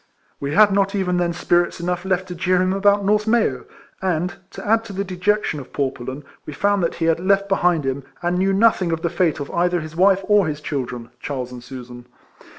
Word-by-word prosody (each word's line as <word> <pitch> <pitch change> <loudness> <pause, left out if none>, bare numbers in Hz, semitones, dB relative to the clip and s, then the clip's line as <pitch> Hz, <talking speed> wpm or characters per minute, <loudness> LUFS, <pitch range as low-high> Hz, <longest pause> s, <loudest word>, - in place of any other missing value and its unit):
We 140 +2 -3
had 210 -1 +6
not 195 +1 +1
even 180 -2 0
then 175 -1 +1
spirits 175 0 +1
enough 180 +1 -2
left 190 -1 0
to - - -4
jeer 180 +1 +1
him 185 +1 +1
about 200 0 +3
North 210 +2 +2
May/w; 220 - +1 0.4
and, 180 -1 -1 0.2
to - - -9
add 225 +1 +3
to 205 - -8
the 195 +1 -2
dejection 185 -2 0
of 130 - -11
poor 140 -2 0
Pullen, 130 +4 -7 0.2
we 150 - -8
found 200 +4 +1
that 170 - -1
he 165 - -2
had 165 0 +2
left 195 +2 +2
behind 180 -6 +2
him, 135 +1 -2 0.2
and 175 +1 0
knew 195 +1 +2
nothing 195 -3 +3
of 165 0 -2
the 170 - 0
fate 170 -3 +1
of 140 - -6
either 175 +1 +1
his 155 0 -8
wife 190 +2 +4
or 205 -3 +3
his 150 -1 -3
children, 125 -5 -5
Charles 130 -3 -4
and 125 -1 -9
Susan. 125 -1 -10
175 Hz, 225 wpm, -21 LUFS, 150-195 Hz, 0.4 s, had